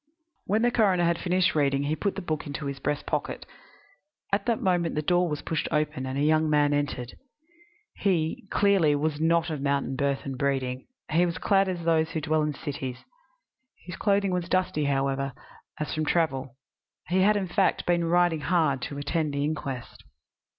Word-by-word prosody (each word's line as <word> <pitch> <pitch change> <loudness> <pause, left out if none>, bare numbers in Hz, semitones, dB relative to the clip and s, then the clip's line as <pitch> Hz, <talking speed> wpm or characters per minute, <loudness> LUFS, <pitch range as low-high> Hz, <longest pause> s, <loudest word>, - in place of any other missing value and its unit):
When 215 +4 +2
the 240 - +3
coroner 195 -7 +3
had 170 0 +2
finished 185 0 +2
reading 140 -2 +1
he 150 +2 0
put 190 +5 -2
the 195 - -5
book 155 -4 -3
into 145 +1 -5
his 140 -1 -4
breast 145 +1 -2
pocket. - - -3 0.9
At 200 +2 +1
that 230 -2 +1
moment 175 -3 +1
the 150 - -1
door 175 +2 +2
was 150 -1 -4
pushed 160 -3 -2
open 150 -3 -1
and 130 +1 -3
a 140 - +1
young 155 +1 +3
man 145 -1 +3
entered. 145 -4 -2 0.8
He, 175 -1 0
clearly, 195 -8 +3
was 150 0 -1
not 165 0 +2
of 150 -3 -4
mountain 140 -1 0
birth 140 0 0
and 135 -2 -5
breeding: 130 -2 -1 0.2
he 165 +3 +4
was 170 -2 -1
clad 195 +1 +2
as 175 -2 -3
those 160 -1 +2
who 165 -1 -2
dwell 155 +1 +1
in 150 -1 -1
cities. 135 -4 -5 0.8
His 180 -1 -6
clothing 200 -1 +1
was 180 -1 -2
dusty, 180 -5 +1
however, 135 -1 0 0.5
as 150 - -3
from 155 0 -1
travel. 135 -7 0 0.5
He 185 +2 +2
had, 210 +2 +4
in 195 -2 -2
fact, 190 +2 +1
been 175 -1 +2
riding 175 -2 +2
hard 155 -6 +1
to 140 - -5
attend 145 0 -1
the 140 - 0
inquest. 140 -4 -4
155 Hz, 185 wpm, -27 LUFS, 140-175 Hz, 0.9 s, he